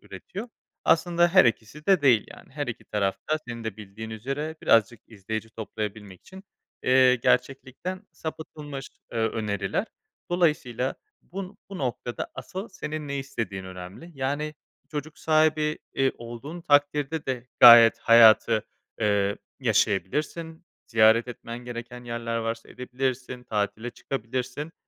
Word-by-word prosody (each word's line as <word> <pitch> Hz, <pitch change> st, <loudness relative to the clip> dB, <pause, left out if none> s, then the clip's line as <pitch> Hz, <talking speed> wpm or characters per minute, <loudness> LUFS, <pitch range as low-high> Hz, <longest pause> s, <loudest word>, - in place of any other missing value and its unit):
üretiyor. 215 Hz, +6 st, -8 dB, 0.4 s
Aslında 175 Hz, +1 st, +4 dB
her 185 Hz, +2 st, +6 dB
ikisi 115 Hz, +5 st, -1 dB
de 190 Hz, -6 st, +4 dB
değil, 125 Hz, -6 st, +4 dB
yani, -, -, -14 dB
her 145 Hz, 0 st, -3 dB
iki 120 Hz, 0 st, -6 dB
taraf 100 Hz, -2 st, -1 dB
da 155 Hz, -, +2 dB
senin 115 Hz, -1 st, -6 dB
de 110 Hz, -3 st, -4 dB
bildiğin 110 Hz, +1 st, -9 dB
üzere 140 Hz, +8 st, -4 dB
birazcık 115 Hz, 0 st, +3 dB
izleyici 110 Hz, +1 st, -6 dB
toplayabilmek 105 Hz, -3 st, -6 dB
için, 190 Hz, +1 st, -13 dB, 0.4 s
eee, 130 Hz, 0 st, +5 dB
gerçeklikten 135 Hz, -, -1 dB
sapıtılmış, 150 Hz, -3 st, -7 dB, 0.2 s
eee, 115 Hz, -, -2 dB
öneriler. 105 Hz, -, -1 dB, 0.4 s
Dolayısıyla 145 Hz, -8 st, +1 dB, 0.3 s
bu 190 Hz, 0 st, -6 dB
n -, -, -16 dB, 0.2 s
bu 195 Hz, -1 st, -7 dB
noktada 120 Hz, -2 st, -3 dB
asıl 190 Hz, +5 st, -6 dB
senin 155 Hz, -5 st, -6 dB
ne 140 Hz, 0 st, -2 dB
istediğin 115 Hz, -9 st, -4 dB
önemli. 95 Hz, -, -9 dB
Yani, 145 Hz, +3 st, -2 dB, 0.3 s
çocuk 150 Hz, +1 st, -6 dB
sahibi, 155 Hz, -1 st, +2 dB, 0.2 s
iii, 135 Hz, 0 st, +2 dB
olduğun 120 Hz, +8 st, -8 dB
takdirde 145 Hz, 0 st, +2 dB
de 125 Hz, -2 st, -3 dB
gayet 115 Hz, -1 st, +10 dB
hayatı, 115 Hz, -1 st, +6 dB, 0.4 s
eee, 100 Hz, -1 st, +2 dB, 0.2 s
yaşayabilirsin. 135 Hz, -, 0 dB, 0.2 s
Ziyaret 115 Hz, +1 st, +4 dB
etmen 120 Hz, -1 st, -7 dB
gereken 120 Hz, 0 st, -8 dB
yerler 115 Hz, -1 st, -3 dB
varsa 115 Hz, 0 st, -3 dB
edebilirsin, 125 Hz, 0 st, -4 dB
tatile 110 Hz, +1 st, -2 dB
çıkabilirsin 130 Hz, +5 st, -4 dB
125 Hz, 130 wpm, -26 LUFS, 110-150 Hz, 0.4 s, gayet